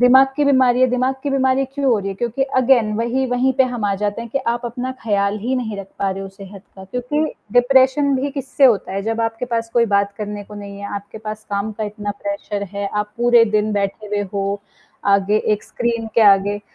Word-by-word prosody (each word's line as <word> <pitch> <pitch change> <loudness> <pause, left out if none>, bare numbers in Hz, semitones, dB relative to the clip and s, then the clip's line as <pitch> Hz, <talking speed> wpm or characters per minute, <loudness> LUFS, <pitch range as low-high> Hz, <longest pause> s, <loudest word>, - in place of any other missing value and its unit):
दिमाग 260 +2 +7
की 295 - +2
बीमारी, 255 -2 +4
दिमाग 255 +1 0
की 285 - -2
बीमारी 265 0 +2
क्यों 275 +1 -4
हो 225 - +3
रही 195 0 -4
है? 195 - -4
क्योंकि 240 +5 -2 0.2
अगेन 240 -4 +3
वहीं, 240 +4 0
वहीं 250 +2 +1
पे - - +7
हम 225 -3 -3
आ 200 -1 +1
जाते 205 +2 -1
हैं 230 - -9
कि 275 - 0 0.2
आप 240 +1 -6
अपना 245 +2 -4
ख़राबल 200 -1 0
ही 260 +2 0
नहीं 220 -4 -3
रख 195 - -6
पा 195 -1 0
रहे 195 +1 -4
हो 195 - -6
सेहत 195 0 -12
का 190 - -10
क्योंकि 250 +9 -2 0.3
डिप्रेशन 265 +3 +4
भी 280 +2 -1
किससे 275 0 0
होता 215 -7 +3
है? 195 +1 -2
जब 225 +1 -2
आपके 225 +1 -1
पास 230 0 -2
कोई 235 -1 +5
बात 200 0 +1
करने 205 -1 -5
को 210 - -12
नहीं 200 -1 -8
है, 200 0 -6
आपके 200 +2 -7
पास 215 0 -7
काम 200 +2 -2
का 215 - -1
इतना 205 0 -5
प्रेशर 200 0 -3
है, 200 - -1
आप 210 0 -2
पूरे 240 -1 +5
दिन 210 0 +1
बैठे 200 +1 -2
हुए 205 0 -1
हो, 200 0 -1 0.4
आगे 200 +1 +3 0.2
एक - - -18
स्क्रीन 235 -2 -2
के 230 - +4
आगे, 205 0 +4
225 Hz, 230 wpm, -20 LUFS, 200-255 Hz, 0.4 s, दिमाग